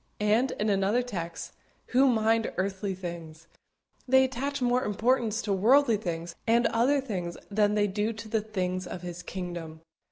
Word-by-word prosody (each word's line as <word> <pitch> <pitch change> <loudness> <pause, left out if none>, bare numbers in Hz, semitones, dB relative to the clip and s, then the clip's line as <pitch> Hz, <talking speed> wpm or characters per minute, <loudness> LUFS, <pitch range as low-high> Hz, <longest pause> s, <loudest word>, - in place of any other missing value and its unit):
And, 215 +5 +2
in 210 - -1
another 200 +5 +2
text: 170 -8 -5 0.4
"Who 265 +2 +4
mind 225 -2 +2
earthly 190 +1 -2
things." 165 -3 -8 0.6
They 265 +1 +6
attach 270 +2 -2
more 250 0 +2
importance 225 +1 +1
to 205 - 0
worldly 235 +4 +4
things 170 -4 -4
and 235 +1 +4
other 245 +6 +3
things 185 -10 -4
than 210 0 +2
they 205 -1 +3
do 210 +2 -1
to 220 0 -9
the 220 0 0
things 185 -4 -3
of 180 0 -7
His 175 0 -6
kingdom. 175 -3 -6
210 Hz, 160 wpm, -28 LUFS, 180-235 Hz, 0.6 s, They